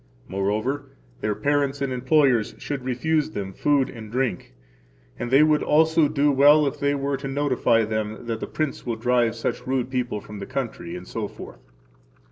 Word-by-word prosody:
Moreover, 110 +9 -1 0.3
their 105 -1 -1
parents 140 +4 0
and 140 -2 -1
employers 130 -2 +2
should 140 -3 -5
refuse 145 +5 0
them 100 -8 -5
food 140 +4 +2
and 110 -3 -10
drink, 125 - -2 0.6
and 120 - -3
[they 135 +4 +6
would 155 -1 +3
also 160 0 +4
do 145 0 +2
well 145 +2 +6
if 140 - -3
they 140 0 +1
were 140 0 -1
to] 135 +1 -6
notify 135 -5 +2
them 110 +1 -3
that 115 -1 -3
the - - -5
prince 155 -3 -3
will 120 -2 -2
drive 120 0 +1
such 115 - -3
rude 130 -1 -1
people 125 -5 -1
from 105 0 -10
the 100 - -6
country, 115 -10 -4
etc. 100 +4 -7
130 Hz, 170 wpm, -24 LUFS, 110-145 Hz, 0.6 s, they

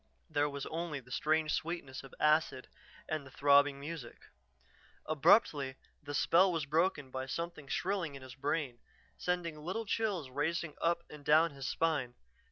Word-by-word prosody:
There 145 -1 +2
was 140 -1 -5
only 165 -3 -3
the 125 -1 -17
strange 155 +2 +1
sweetness 160 -5 -3
of 135 - -12
acid 150 -4 +2 0.4
and 155 -2 -2
the 135 - -12
throbbing 140 +1 +4
music. 145 -3 -7 0.8
Abruptly 145 -3 +3 0.3
the 145 0 -5
spell 180 +6 +4
was 165 -4 -1
broken 150 -2 +1
by 130 0 -4
something 170 0 -5
shrilling 180 -3 -1
in 135 - -10
his 130 -1 -10
brain, 135 -2 -2 0.4
sending 175 -3 -2
little 190 +8 -3
chills 200 - -1
racing 155 +3 -1
up 170 0 +1
and 150 -1 -12
down 155 +3 +5
his 135 -2 -6
spine. 145 -5 0
150 Hz, 155 wpm, -33 LUFS, 140-170 Hz, 0.8 s, down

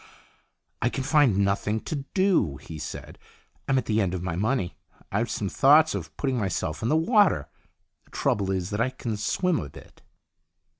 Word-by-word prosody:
" - - -48
I 120 - +2
can 135 - -3
find 145 -7 +3
nothing 100 +2 +1
to 155 - -4 0.2
do," 185 - +2
he 80 +1 -9
said. 75 - -8 0.2
" - - -39
I'm 135 - +2
at 130 - 0
the 110 0 +1
end 95 -2 -1
of 90 - -4
my 90 -3 -2
money. 105 -1 -1 0.4
I've - - 0
some 100 - -2
thoughts 145 - +5
of - - -6
putting 130 -3 -1
myself 85 -6 -2
in 115 - -1
the 155 - +3
water. 205 +1 +3 0.6
The - - -26
trouble 100 -2 0
is 95 -1 -2
that 105 +2 -1
I 125 - +2
can 120 -3 -4
swim 165 - 0
a 70 - -6
bit." - - -15
110 Hz, 195 wpm, -26 LUFS, 95-145 Hz, 0.6 s, thoughts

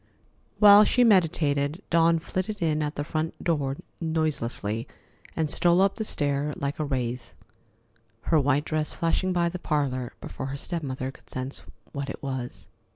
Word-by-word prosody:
While 205 0 +9
she 250 +3 +3
meditated, 165 -5 +2
Dawn 165 0 +4
flitted 185 +5 -3
in 155 -2 +1
at 150 0 -2
the 145 - -2
front 155 +1 -2
door 145 -5 0 0.2
noiselessly 140 -8 -2 0.5
and 160 -1 0
stole 175 +4 +3
up 195 0 +3
the 220 - -1
stair 145 -5 -1
like 140 +1 -3
a - - +1
wraith, 125 -4 -3 0.9
her 160 +4 +2
white 145 +1 +2
dress 155 -1 -1
flashing 170 +3 0
by 175 -1 +2
the 180 +1 -4
parlor 135 -7 -1
before 130 - -6
her 140 +1 -4
step 170 +4 -4
mother 130 -2 -4
could - - -21
sense 130 +2 -4 0.3
what 140 -1 -4
it - - -7
was. 130 -3 -5
150 Hz, 160 wpm, -26 LUFS, 140-170 Hz, 0.9 s, While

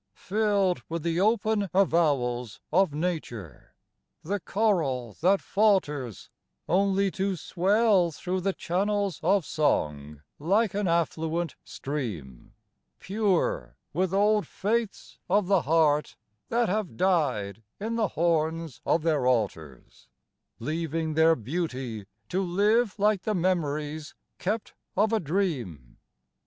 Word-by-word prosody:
Filled 200 -2 +1
with 165 -1 -3
the 170 0 0
open 215 -1 +1
avowals 135 - +1
of 190 -1 +4
nature, 150 - -5 0.5
the 200 +5 -2
choral 165 - 0
that 190 +4 +4
falters 150 - 0 0.4
Only 195 +2 +2
to 195 +1 -1
swell 190 +2 +2
thro' 185 +4 -3
the 195 +2 0
channels 200 +1 -1
of 190 +1 +2
song 75 - -1 0.2
like 200 +7 +2
an 205 -1 -1
affluent 165 0 -1
stream, 105 - -6 0.4
Pure 200 -2 -1 0.2
with 180 +3 0
old 210 +2 +2
faiths 220 +1 -2
of 200 +1 +3
the 195 -1 +3
heart 150 -1 +2 0.3
that 235 0 +2
have 210 -1 -2
died 135 - +1 0.2
in 225 +3 -3
the 225 -2 +1
horns 165 -3 0
of 165 - +1
their 150 -6 +1
altars, 90 - -2 0.5
Leaving 160 +3 -2
their 160 +1 +5
beauty 130 - -4 0.2
to 185 - 0
live 205 +5 +2
like 210 -1 +2
the 215 +1 -1
memories 155 -4 -1 0.2
kept 210 +4 -2 0.2
of 215 +3 +3
a 220 - +3
dream. 140 - -3
170 Hz, 115 wpm, -27 LUFS, 145-200 Hz, 0.5 s, their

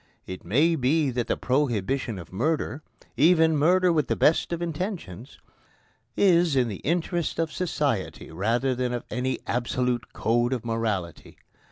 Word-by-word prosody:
It 95 0 -8
may 150 - +2
be 140 +1 +1
that 120 -1 -2
the - - 0
prohibition 125 -3 -1
of 85 0 -10
murder 150 +6 -1 0.4
even 160 +1 +5
murder 180 +4 +3
with 150 -6 +1
the - - 0
best 160 - +2
intentions 165 - -5 0.8
is 175 -5 +4
in 125 -3 +2
the 100 - -5
interests 170 +1 -1
of 165 -1 -1
society 145 - -2
rather 115 +9 0
than 125 0 -2
of 120 - -3
any 130 +1 -1
absolute 120 0 -1
code 120 +2 +1
of 120 -3 -4
morality. 110 -7 -3
130 Hz, 145 wpm, -25 LUFS, 115-160 Hz, 0.8 s, even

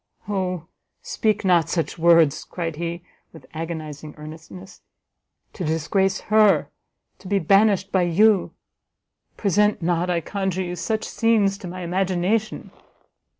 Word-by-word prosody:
"O 185 -4 -2 0.4
speak 215 -2 -1
not 170 -3 +3
such 165 -1 -2
words!" 165 -3 +4
cried 165 -4 -5
he, 170 +1 -4 0.3
with 160 - -14
agonizing 155 -2 -6
earnestness, 160 +5 -11 0.7
"to 185 - -6
disgrace 190 +5 0
her, 215 -2 +3 0.5
to - - -12
be 200 +1 +1
banished 195 +2 +3
by 190 - +2
you, 190 +3 +3 0.9
present 210 -1 +1
not, 175 +1 0
I 175 -1 +1
conjure 190 +1 -3
you, 175 0 -5
such 220 +4 -2
scenes 220 -4 +1
to 195 - -8
my 180 +1 -7
imagination!" 190 +4 -1
180 Hz, 125 wpm, -22 LUFS, 165-200 Hz, 0.9 s, words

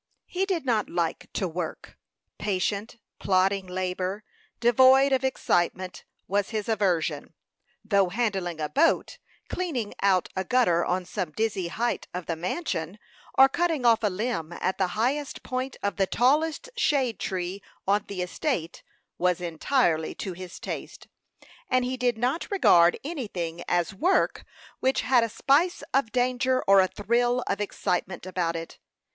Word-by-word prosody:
He 380 +2 -2
did 350 -7 -1
not 225 -5 +1
like 170 -2 -2
to 190 - -1
work. 165 -1 -6 0.4
Patient, 205 +3 -2 0.2
plodding 190 0 +2
labor, 185 +2 -3 0.4
devoid 260 +3 +6
of 265 -1 +2
excitement, 185 -7 -1 0.2
was 200 0 0
his 215 -2 -3
aversion; 170 -9 0 0.5
though 200 -4 +3
handling 190 -6 -1
a 150 - -1
boat, 330 - +1 0.3
cleaning 280 - -3
out 190 -2 +3
a 190 - -1
gutter 185 -8 +3
on 180 +1 -1
some 185 -2 -3
dizzy 210 -4 -1
height 235 +7 -2
of 180 -1 -4
the 165 - -2
mansion, 180 - -3 0.4
or 265 - +8
cutting 325 -2 0
off 230 -2 +5
a 210 - +2
limb 190 -4 -3
at 185 +2 -2
the 190 - +3
highest 275 +5 -1
point 255 +1 -3
of 200 - -1
the 195 -1 +2
tallest 305 - +1
shade 275 - +1
tree 185 0 -3 0.3
on 205 +1 +2
the 185 -3 -3
estate, 180 - -3 0.4
was 180 0 +2
entirely 170 - 0
to 190 - -5
his 185 0 -9
taste, - - -7 0.6
and 255 -1 +2
he 255 +1 -2
did 250 -2 0
not 250 +8 -1
regard 175 - +5
anything 190 - -4
as 175 +1 +1
work 350 - +1 0.3
which 265 +1 +1
had 250 -3 +4
a 230 - -1
spice 290 +10 +2
of 260 -4 +2
danger 255 +1 +1
or 195 0 +6
a 190 - +5
thrill 240 +5 +1
of 200 - -2
excitement 180 -3 -2
about 175 -2 -1
it. 165 0 -7
205 Hz, 150 wpm, -26 LUFS, 180-255 Hz, 0.6 s, or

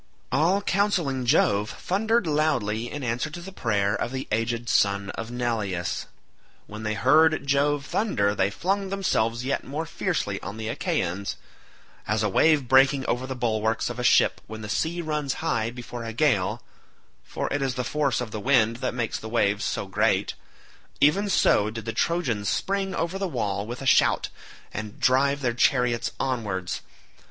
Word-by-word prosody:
All 170 +9 +2
counselling 170 -13 0
Jove 105 -2 +3
thundered 220 +4 0
loudly 125 -8 0
in 145 -1 -5
answer 125 +5 -1
to 155 - -8
the 185 +3 -9
prayer 105 - 0
of 120 - -2
the 130 0 -4
aged 115 +2 -1
son 100 -2 +2
of 115 0 -6
Neleus. 105 -8 -2 0.6
When 105 +1 -9
they 110 0 -2
heard 155 +5 +4
Jove 140 +1 +1
thunder 105 - +1
they 95 -1 +1
flung 195 - -1
themselves 125 - 0
yet 140 +2 -1
more 150 +4 -4
fiercely - - -2
on 100 +3 -7
the 110 0 -4
Achaeans. 100 - -2 0.7
As 105 0 +1
a 105 - +1
wave 150 +5 +3
breaking 135 +1 +4
over 125 +2 -1
the 130 - -4
bulwarks 110 -1 0
of 120 - -7
a - - -2
ship - - +4
when 110 0 -8
the 105 - -6
sea 170 +9 -1
runs 150 -3 -2
high 120 -9 -1
before 120 0 -7
a 115 0 -5
gale—for 115 -8 -3
it 145 - -1
is 135 -2 -1
the 125 - -1
force 145 +1 0
of 120 -3 -5
the 110 - -4
wind 115 -1 +3
that 125 0 -3
makes 120 -3 -2
the 110 - -7
waves 105 -3 +1
so - - -2
great—even 195 +8 -1
so 105 - +3
did 110 0 -7
the 115 - -3
Trojans 130 - 0
spring 195 -1 -1
over 170 +4 -2
the 195 - -1
wall 105 - -2
with 120 +3 -6
a - - -6
shout, 130 - +3 0.4
and 105 0 -6
drive 140 +2 +3
their 120 -3 0
chariots 125 -1 +2
onwards. 105 -9 -2
125 Hz, 170 wpm, -25 LUFS, 110-150 Hz, 0.7 s, heard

